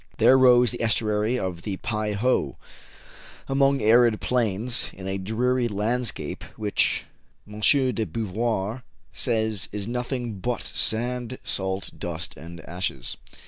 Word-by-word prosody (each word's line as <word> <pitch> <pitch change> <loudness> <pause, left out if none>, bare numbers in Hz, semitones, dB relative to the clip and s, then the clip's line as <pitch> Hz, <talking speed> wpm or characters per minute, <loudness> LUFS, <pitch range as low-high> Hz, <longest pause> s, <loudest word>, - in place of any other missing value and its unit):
There 130 - +6
rose 125 -2 +6
the 120 - -6
estuary 110 +1 +1
of 90 -6 -3
the 95 0 -4
Pei 105 -3 -2
ho, 125 +6 0 0.9
among 135 0 +2
arid 115 0 +5
plains, 120 0 +1
in 95 0 -8
a 95 0 -2
dreary 120 +5 0
landscape, 115 +3 -2
which, 105 -1 +1 0.4
M. 105 0 -9
de 125 -3 +3
Beauvoir 110 +4 -2 0.3
says, 110 -4 0
is 105 0 -4
nothing 120 -3 -3
but 120 +5 -2
sand, 120 +2 0
salt, 95 0 -2
dust, 85 +1 -5
and 85 +1 -10
ashes. 85 -7 -3
110 Hz, 125 wpm, -25 LUFS, 100-125 Hz, 0.9 s, There